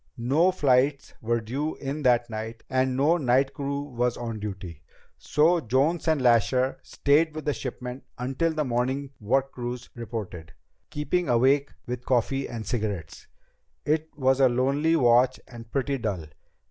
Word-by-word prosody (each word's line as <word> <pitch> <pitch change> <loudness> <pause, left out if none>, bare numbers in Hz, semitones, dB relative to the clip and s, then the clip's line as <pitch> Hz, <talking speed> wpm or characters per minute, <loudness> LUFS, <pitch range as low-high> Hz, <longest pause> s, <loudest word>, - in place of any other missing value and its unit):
No 140 +10 +3
flights 140 -4 +2
were 115 +1 0
due 135 +8 -3
in 140 +2 -4
that 120 -3 +3
night, 110 +1 -6
and 130 0 +1
no 155 +6 +3
night 135 -1 +2
crew 140 0 -3
was 125 -4 -1
on 115 -2 -5
duty; 95 -6 -7 0.4
so 165 +4 +3
Jones 145 +7 +1
and 160 -2 +3
Lasher 125 +1 +2
stayed 155 +2 +1
with 155 - -6
the 150 - +1
shipment 125 0 -6
until 135 +7 -1
the 155 -1 -1
morning 130 +3 -1
work 135 +6 +1
crews 120 0 -6
reported, 110 -9 -7 0.4
keeping 170 +4 -1
awake 135 +4 +3 0.2
with 125 0 -5
coffee 135 +2 0
and 115 -3 -6
cigarettes. 105 -8 -4 0.6
It 155 +1 0
was 130 -1 +2
a 130 -1 +6
lonely 140 +6 +2
watch 125 -2 +4
and 115 -2 -12
pretty 135 +1 -1
dull. 100 -8 -3
130 Hz, 150 wpm, -26 LUFS, 120-140 Hz, 0.6 s, a